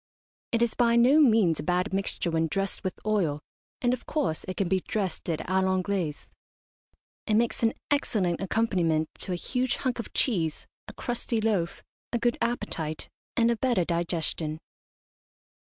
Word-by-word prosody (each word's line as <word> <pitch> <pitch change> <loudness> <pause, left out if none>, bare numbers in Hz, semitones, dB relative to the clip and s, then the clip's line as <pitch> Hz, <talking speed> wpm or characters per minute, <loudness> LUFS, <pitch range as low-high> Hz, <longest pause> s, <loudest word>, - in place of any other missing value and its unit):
It 235 0 +3
is 235 - +1
by 235 -1 +3
no 250 +6 +6
means 220 - +5
a - - -3
bad 180 +3 0
mixture 195 -3 -1
when 165 0 +1
dressed 195 +6 -2
with 185 - -3
oil, 185 -9 +1 0.4
and, 245 0 +3
of 250 - -5
course, 275 - -1
it 185 - -4
can 195 - +1
be 190 +1 +2
dressed 190 -3 -3
it 160 -2 -1
a 190 +1 +2
l'Anglaise. 185 -4 -1 1.0
It 215 - +3
makes 230 +1 +1
an 225 -1 +3 0.2
excellent 195 -12 +1
accompaniment 180 -7 +1
to - - -5
a - - +1
huge 250 +8 0
hunk 255 -2 -2
of 235 - -5
cheese, 165 - +1 0.2
a - - -8
crusty 240 -1 -2
loaf, 205 -6 0 0.3
a 240 - +1
good 240 0 +1
appetite, 160 -10 -2 0.3
and 235 0 +4
a 235 - 0
better 235 -8 +2
digestion. 170 -2 -1
195 Hz, 165 wpm, -27 LUFS, 170-235 Hz, 1.0 s, no